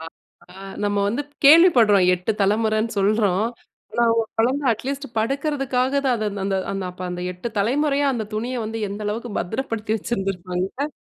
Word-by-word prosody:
ஆ! 160 - -8 0.5
ஆ - - -17 0.3
நம்ம 205 0 0
வந்து 235 +8 -1 0.2
கேள்விப்படுறோம். 250 - +7
8 180 +5 -3
தலைமுறைனு 215 +2 +1
சொல்றோம். 205 0 +2 0.5
ஆனா 235 - +2
ஒரு 225 -1 -1
குழந்தை 265 +5 +1
அட்லீஸ்ட் 275 +5 -4
படுக்கறதுக்காக, 270 +1 0
தான் 255 - +3
அத 215 -1 -2 0.2
அந்த 195 -1 0 0.2
அந்த 195 -1 -3
அப்ப 180 +1 -10
அந்த 180 0 -5
8 180 +6 -5
தலைமுறையா, 280 +6 +1
அந்த 220 -3 -3
துணிய 245 +4 -2
வந்து, 225 +1 -4
எந்த 205 +2 -6
அளவுக்கு 230 +3 -3
பத்திரப்படுத்தி 220 +2 -3
வச்சுருந்துருப்பாங்க. 195 - -3
220 Hz, 150 wpm, -22 LUFS, 200-260 Hz, 0.5 s, கேள்விப்படுறோம்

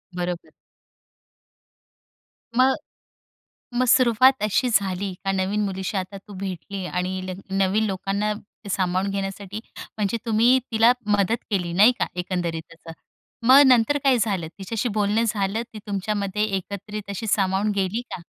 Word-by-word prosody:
बरोबर. 175 -1 -4 2.1
मग, 260 +1 +5 1.0
मग 250 +1 +2
सुरुवात 255 0 +5
अशी 230 +4 +1
झाली 195 -3 0
का 195 - +2
नवीन 195 +2 0
मुलीशी 190 0 -3
आता 190 +1 -4
तू 200 +1 -13
भेटली 190 0 -5
आणि 185 +1 -2
ल - - -3 0.2
नवीन 195 +3 +2
लोकांना 200 +2 -1 0.4
सामावून 185 +1 0
घेण्यासाठी. 195 +1 -4 0.4
म्हणजे 210 +2 0
तुम्ही 230 +3 +4
तिला 225 +2 +5 0.3
मदत 200 +4 +2
केली. 180 -4 0
नाही 210 +7 +7
का? - - +2
एकंदरीत 175 -3 -3
असं. 165 0 -12 0.6
मग 270 +2 +9
नंतर 255 +3 +4
काय 265 -3 +4
झालं 195 -8 -1
तिच्याशी 220 +5 -2
बोलणं 210 +2 +1
झालं 210 +1 -1
ती 215 - -7
तुमच्यामध्ये 200 0 -1
एकत्रित 200 +2 -7
अशी 215 +3 -4
सामावून 195 +1 +1
गेली 195 +4 0
का? 170 - -9
200 Hz, 135 wpm, -23 LUFS, 190-220 Hz, 2.1 s, मग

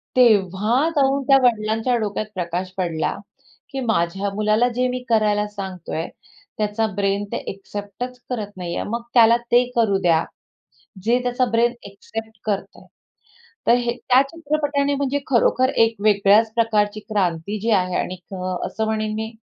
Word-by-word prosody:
तेव्हा 220 - +3
जाऊन 275 -1 +2
त्या 275 -1 +7
वडिलांच्या 225 +1 +2
डोक्यात 215 -1 -2
प्रकाश 180 +1 -3
पडला, 170 -4 -1 0.6
की 270 - -5
माझ्या 200 -5 0
मुलाला 215 +3 +2
जे 250 +1 +1
मी 250 0 -2
करायला 210 -2 +2
सांगतोय, 190 -5 -5 0.5
त्याचा 215 +1 0
ब्रेन 200 0 0
ते - - -1
ॲक्सेप्टच 205 +5 -7
करत 215 -5 -3
नाहीये. 175 -1 -3
मग 235 +3 -3
त्याला 235 -1 +6
ते 245 +1 +6
करू 220 -4 +3
द्या, 165 -3 +3 0.8
जे 235 +3 +3
त्याचा 245 +1 +1
ब्रेन 235 +1 +3
ॲक्सेप्ट 220 +2 -8
करतंय. 205 -2 -4 0.8
तर - - +6
हे 240 -1 -1
त्या 250 +2 +4
चित्रपटाने 290 -3 -1
म्हणजे 280 0 -1
खरोखर 255 0 +3 0.2
एक 225 0 -3
वेगळ्याच 210 +1 +4
प्रकारची 215 -2 +1
क्रांती 195 -1 -1
जी 225 +3 -2
आहे 180 0 -3
आणि 185 - -3 0.2
क 185 -1 -5 0.2
असं 220 - -2
म्हणेन 215 -1 -1
मी 220 +1 -4
220 Hz, 145 wpm, -22 LUFS, 200-245 Hz, 0.8 s, त्या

